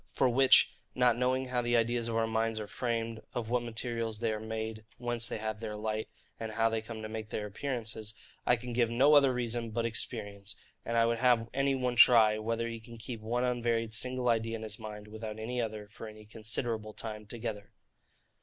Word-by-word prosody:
For 130 Hz, -, +2 dB
which 130 Hz, +2 st, +6 dB, 0.2 s
(not 125 Hz, -2 st, +4 dB
knowing 130 Hz, +1 st, +1 dB
how 125 Hz, -1 st, +1 dB
the 120 Hz, 0 st, +2 dB
ideas 115 Hz, 0 st, +1 dB
of 115 Hz, -1 st, -1 dB
our 115 Hz, -, +3 dB
minds 115 Hz, 0 st, 0 dB
are 105 Hz, -, -4 dB
framed, 115 Hz, 0 st, -2 dB
of 115 Hz, -1 st, -3 dB
what 125 Hz, 0 st, +3 dB
materials 115 Hz, -1 st, -2 dB
they 115 Hz, 0 st, 0 dB
are 110 Hz, -, -3 dB
made, 110 Hz, 0 st, -4 dB
whence 120 Hz, -1 st, -1 dB
they -, -, -3 dB
have 110 Hz, 0 st, -3 dB
their 110 Hz, -2 st, -4 dB
light, 110 Hz, 0 st, -2 dB, 0.3 s
and 110 Hz, -1 st, -4 dB
how 115 Hz, +1 st, +3 dB
they 110 Hz, -1 st, -1 dB
come 110 Hz, 0 st, -7 dB
to -, -, -3 dB
make 110 Hz, 0 st, -5 dB
their 105 Hz, -, -3 dB
appearances) 110 Hz, -1 st, -3 dB, 0.3 s
I 125 Hz, -, +4 dB
can 120 Hz, +1 st, -6 dB
give 120 Hz, -1 st, +3 dB
no 130 Hz, +6 st, +5 dB
other 140 Hz, -2 st, +7 dB
reason 120 Hz, -2 st, -1 dB
but 115 Hz, +1 st, -1 dB
experience: 105 Hz, -2 st, -3 dB, 0.3 s
and 115 Hz, 0 st, -1 dB
I 115 Hz, -, +5 dB
would 115 Hz, 0 st, +1 dB
have 120 Hz, -2 st, +3 dB
any 135 Hz, +1 st, +2 dB
one 125 Hz, -2 st, -1 dB
try, 110 Hz, -3 st, +7 dB
whether 115 Hz, +1 st, -1 dB
he 115 Hz, -1 st, -5 dB
can 115 Hz, +1 st, -12 dB
keep 115 Hz, 0 st, -6 dB
one 120 Hz, +3 st, 0 dB
unvaried 120 Hz, -2 st, 0 dB
single 125 Hz, +2 st, -1 dB
idea 115 Hz, -1 st, +2 dB
in 110 Hz, -, -6 dB
his 110 Hz, 0 st, -5 dB
mind, 105 Hz, -1 st, -7 dB
without 110 Hz, 0 st, -6 dB
any 120 Hz, +3 st, -2 dB
other, 110 Hz, -2 st, -4 dB
for 110 Hz, -, -8 dB
any 110 Hz, 0 st, -11 dB
considerable 110 Hz, 0 st, -3 dB
time 105 Hz, -1 st, -6 dB
together. 110 Hz, -3 st, -5 dB
115 Hz, 210 wpm, -31 LUFS, 110-120 Hz, 0.3 s, other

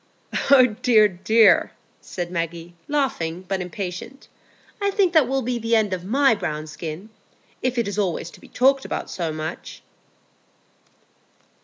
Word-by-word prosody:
"Oh 270 Hz, -2 st, +8 dB, 0.2 s
dear, 220 Hz, -4 st, +5 dB
dear!" 205 Hz, +1 st, +3 dB, 0.3 s
said 175 Hz, -1 st, -6 dB
Maggie, 170 Hz, 0 st, -4 dB
laughing, 185 Hz, -, -2 dB
but 190 Hz, 0 st, -2 dB
impatient; 180 Hz, -, -7 dB, 0.5 s
"I 400 Hz, -, +2 dB
think 390 Hz, -3 st, +1 dB
that 310 Hz, -6 st, +5 dB
will 270 Hz, +1 st, -1 dB
be 245 Hz, 0 st, -2 dB
the 230 Hz, 0 st, +1 dB
end 210 Hz, -3 st, +1 dB
of 180 Hz, -1 st, -4 dB
my 260 Hz, +5 st, +3 dB
brown 155 Hz, -7 st, -4 dB
skin, 160 Hz, +6 st, -8 dB, 0.5 s
if 255 Hz, 0 st, -1 dB
it 235 Hz, -3 st, 0 dB
is 200 Hz, +1 st, -3 dB
always 175 Hz, -4 st, -2 dB
to -, -, -16 dB
be -, -, -15 dB
talked 270 Hz, +1 st, +2 dB
about -, -, -5 dB
so 170 Hz, -4 st, -3 dB
much." 155 Hz, +2 st, -7 dB
205 Hz, 150 wpm, -23 LUFS, 175-255 Hz, 0.5 s, Oh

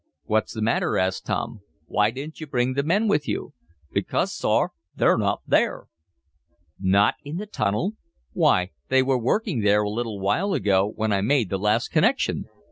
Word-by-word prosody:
"What's 110 Hz, 0 st, 0 dB
the 110 Hz, -, -2 dB
matter?" 115 Hz, -, +1 dB
asked 95 Hz, 0 st, -1 dB
Tom. -, -, -2 dB, 0.3 s
"Why 105 Hz, +5 st, +2 dB
didn't 140 Hz, +7 st, -8 dB
you 155 Hz, -, -6 dB
bring 125 Hz, -1 st, 0 dB
the 140 Hz, -, +1 dB
men 195 Hz, +10 st, +1 dB
with 155 Hz, -8 st, +1 dB
you?" -, -, -3 dB, 0.4 s
"Because, -, -, 0 dB
sor, -, -, +1 dB, 0.2 s
they're -, -, +4 dB
not -, -, 0 dB
there!" -, -, +1 dB, 0.9 s
"Not 100 Hz, +2 st, +3 dB
in 145 Hz, +4 st, -5 dB
the 210 Hz, -, -4 dB
tunnel? 180 Hz, -, -1 dB, 0.4 s
Why, 90 Hz, +1 st, +2 dB, 0.2 s
they 130 Hz, 0 st, +4 dB
were 130 Hz, -1 st, +1 dB
working 185 Hz, -, 0 dB
there 105 Hz, 0 st, +3 dB
a 105 Hz, -, -1 dB
little 110 Hz, -2 st, -3 dB
while 175 Hz, -, 0 dB
ago, 100 Hz, +1 st, +2 dB
when 110 Hz, -1 st, 0 dB
I 100 Hz, -, +1 dB
made 115 Hz, -1 st, +1 dB
the 95 Hz, -, -1 dB
last 105 Hz, +4 st, +1 dB
connection!" 225 Hz, -, +1 dB
115 Hz, 175 wpm, -24 LUFS, 105-150 Hz, 0.9 s, they're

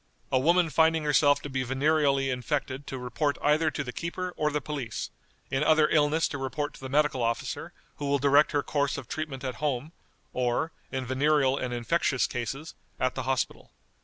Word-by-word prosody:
A 130 Hz, -, +4 dB
woman 170 Hz, +3 st, +3 dB
finding 160 Hz, 0 st, +3 dB
herself 145 Hz, -1 st, +3 dB
to 145 Hz, -, -5 dB
be 130 Hz, -1 st, -1 dB
venereally 135 Hz, +1 st, +2 dB
infected 130 Hz, +1 st, -3 dB
to 135 Hz, -, -4 dB
report 145 Hz, +4 st, -1 dB
either 155 Hz, +2 st, +3 dB
to 140 Hz, -, -3 dB
the 125 Hz, -, -5 dB
keeper 180 Hz, +5 st, -4 dB
or 150 Hz, -, +1 dB
the 150 Hz, 0 st, -1 dB
police; 140 Hz, -6 st, -5 dB, 0.4 s
in 135 Hz, +2 st, +1 dB
other 155 Hz, 0 st, +5 dB
illness 155 Hz, +1 st, +3 dB
to 145 Hz, -, -5 dB
report 145 Hz, +2 st, -3 dB
to -, -, -13 dB
the 130 Hz, -, -7 dB
medical 145 Hz, -2 st, +2 dB
officer, 115 Hz, 0 st, -2 dB, 0.3 s
who 145 Hz, -, -3 dB
will 140 Hz, 0 st, +3 dB
direct 140 Hz, +2 st, +4 dB
her 145 Hz, -2 st, +1 dB
course 145 Hz, -1 st, 0 dB
of 135 Hz, -5 st, -7 dB
treatment 145 Hz, -3 st, -5 dB
at 130 Hz, -4 st, -4 dB
home, 145 Hz, 0 st, -1 dB, 0.4 s
or, 125 Hz, +6 st, 0 dB, 0.2 s
in 130 Hz, -1 st, -3 dB
venereal 135 Hz, +1 st, +2 dB
and 130 Hz, -2 st, -3 dB
infectious 130 Hz, +3 st, +1 dB
cases, 135 Hz, +6 st, -4 dB, 0.3 s
at 130 Hz, 0 st, +1 dB
the 130 Hz, -, -3 dB
hospital. 130 Hz, -1 st, -2 dB
140 Hz, 190 wpm, -28 LUFS, 130-150 Hz, 0.4 s, other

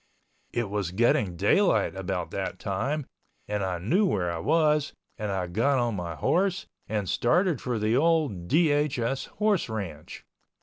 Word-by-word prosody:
It 120 Hz, -2 st, -1 dB
was 100 Hz, -3 st, -2 dB
getting 100 Hz, -2 st, +2 dB
daylight 105 Hz, -, +2 dB
about 95 Hz, -2 st, -3 dB
that -, -, -3 dB
time 150 Hz, 0 st, -2 dB, 0.4 s
and 105 Hz, -1 st, -1 dB
I 95 Hz, -2 st, -1 dB
knew 155 Hz, -, +1 dB
where 90 Hz, -, 0 dB
I 85 Hz, -, -4 dB
was, 150 Hz, -, +2 dB, 0.3 s
and 105 Hz, -1 st, -2 dB
I 95 Hz, -2 st, -1 dB
got 115 Hz, +11 st, +1 dB
on 120 Hz, -2 st, +1 dB
my 85 Hz, -3 st, -4 dB
horse 185 Hz, -, +1 dB, 0.2 s
and 105 Hz, -3 st, -2 dB
started 170 Hz, -, +2 dB
for 125 Hz, -2 st, -2 dB
the 110 Hz, +2 st, +1 dB
old 145 Hz, -, +1 dB
DHS 145 Hz, -, +1 dB
horse 210 Hz, -, 0 dB
ranch. 100 Hz, -9 st, -6 dB
115 Hz, 150 wpm, -27 LUFS, 95-150 Hz, 0.4 s, getting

